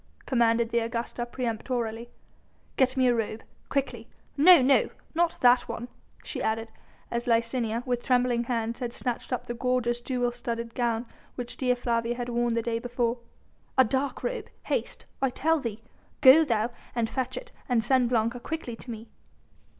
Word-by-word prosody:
commanded 235 -2 +2
the 235 - +3
Augusta 235 +1 -3
peremptorily. 235 -1 -3 0.7
"Get 260 0 +2
me 260 - +4
a 245 - +5
robe 225 -1 -2 0.3
quickly 250 -5 -2 0.3
no, 345 +4 +8
no! 270 +1 +4 0.2
not 335 +1 +1
that 245 0 +5
one," 240 +1 -5 0.3
she - - -5
added, 225 +1 -1 0.4
as 235 +1 -2
Licinia, 230 0 +1
with 245 -2 -1
trembling 245 -2 +2
hands 230 -1 -2
had 240 -2 -3
snatched 245 0 -4
up 250 - -2
the 240 - -4
gorgeous 240 -1 0
jewel 245 -1 0
studded 235 -1 -4
gown 235 -1 0 0.3
which 245 -1 -5
Dea 250 -2 +1
Flavia 235 -1 -1
had 245 0 -4
worn 240 -1 +1
the 230 - 0
day 230 0 -1
before, 240 0 -1 0.6
"a 260 - +8
dark 265 +3 -1
robe - - -3 0.2
haste, - - -2 0.2
I 270 - +3
tell 320 +5 +1
thee! 225 -4 -5 0.4
go 270 +5 +9
thou 230 -4 0 0.3
fetch 255 +2 -3
it - - -8 0.2
and 235 -3 +2
send 255 0 +3
Blanca 235 0 +1
quickly 270 -3 -5
to 245 - -12
me." 225 0 -7
240 Hz, 165 wpm, -27 LUFS, 230-255 Hz, 0.7 s, go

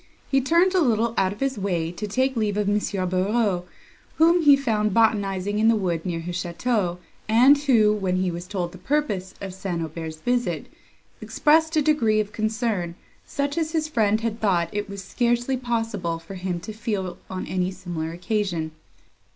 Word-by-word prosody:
He 270 -1 +4
turned 340 +7 +3
a 370 - +3
little 230 -4 +2
out 190 -1 +2
of 205 - -9
his 270 -4 -1
way 175 -4 -1
to 210 +4 -5
take 260 +5 0
leave 210 -3 0
of 210 -1 0
M. 205 +1 +2 0.3
Barreaux, 185 0 +1 0.5
whom 335 +2 +5
he 290 -3 +7
found 215 -6 0
botanizing 205 -3 +1
in 220 - +4
the 225 - +5
wood 175 -5 -1
near 170 -2 -2
his 175 +1 -4
château, 180 0 -1 0.3
and 250 +6 +7
who, 240 -7 +3
when 190 -3 -1
he 185 -1 0
was 175 +1 -6
told 180 -3 -3
the 185 - -12
purpose 205 -8 -1
of 195 -2 -5
St. 185 -2 -4
Aubert's 160 0 -5
visit, 245 +8 -1 0.6
expressed 320 +2 +2
a 305 - +4
degree 235 -8 +3
of 210 -1 -2
concern, 215 -6 -1 0.3
such 285 +3 -2
as 320 0 -2
his 315 -1 0
friend 220 -7 +1
had 225 -1 -3
thought 175 -5 +2
it 205 0 -3
was 200 -1 -7
scarcely 240 +4 0
possible 225 -9 -2
for 165 +4 -11
him 180 -2 -3
to 215 - -7
feel 205 -5 -3
on 185 -1 -4
any 185 -1 -1
similar 175 -4 -5
occasion. 175 -3 -2
210 Hz, 185 wpm, -24 LUFS, 180-240 Hz, 0.6 s, he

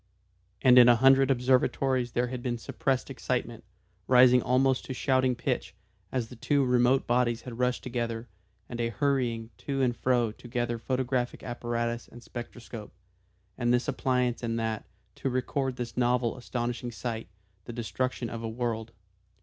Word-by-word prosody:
And 125 -1 +8
in 120 0 +8
a 120 - +7
hundred 135 +2 +5
observatories 130 -1 +2
there 120 - +1
had 125 -1 -5
been 120 -1 -2
suppressed 130 +2 -2
excitement, - - -3 0.4
rising 125 0 +7
almost 130 +1 +2
to 130 - -5
shouting 130 -1 +2
pitch, 120 -5 -2 0.4
as 125 -3 -1
the 125 - -10
two 140 +3 +1
remote 125 +1 +3
bodies 120 -1 +1
had 120 -2 -8
rushed 125 0 0
together, 120 -2 -3 0.4
and 120 -1 -4
a 115 - 0
hurrying 120 -2 0
to 135 -1 -1
and 120 -2 +1
fro, 120 -3 +1
to 120 - -13
gather 120 -1 -2
photographic 125 0 -1
apparatus 120 -1 -3
and 120 - -13
spectroscope, 120 -2 -8 0.7
and 120 -1 +2
this 125 +3 +2
appliance 125 -3 0
and 115 -1 -2
that, 110 -1 -3 0.3
to 135 - -1
record 130 +1 -1
this 120 -1 -5
novel 125 -1 +1
astonishing 120 -1 -3
sight, 115 -2 -4 0.4
the - - -6
destruction 120 +2 -2
of 115 0 -6
a 115 - -3
world. 115 -1 -3
125 Hz, 160 wpm, -28 LUFS, 120-130 Hz, 0.7 s, And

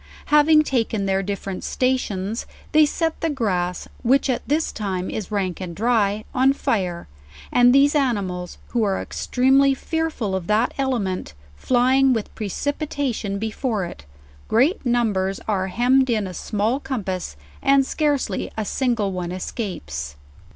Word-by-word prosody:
Having 305 +1 +6
taken 225 -7 0
their 195 0 +1
different 195 -1 -4
stations, 225 -5 -1 0.2
they 310 -1 +6
set 325 +2 -2
the 325 - +1
grass, 185 - -1
which 270 +2 +3
at 245 - -1
this 310 +3 +1
time 190 -3 -3
is 215 - -4
rank 195 -4 -2
and 175 -2 -5
dry, 215 -1 +1
on 265 +1 +4
fire, 180 - -2 0.4
and 245 0 +6
these 275 +2 +5
animals 200 - -1
who 240 - 0
are 200 -3 +1
extremely 270 +2 +2
fearful 320 -9 -2
of 180 -2 -4
that 215 +3 +2
element, 205 - -1 0.2
flying 260 - +3
with 225 -3 -3
precipitation 255 - -2
before 220 -1 -2
it, 70 - -10 0.4
great 265 - +2
numbers 215 -6 +1
are 190 -3 0
hem 245 +7 +3
med 260 -1 +2
in 215 -4 +1
a 185 - -6
small 215 +8 -1
compass, 195 - -4 0.3
and 275 0 +4
scarcely 285 -9 -1
a 220 - -1
single 230 -5 0
one 180 -2 -4
escapes. 175 - -5
225 Hz, 145 wpm, -22 LUFS, 190-265 Hz, 0.4 s, Having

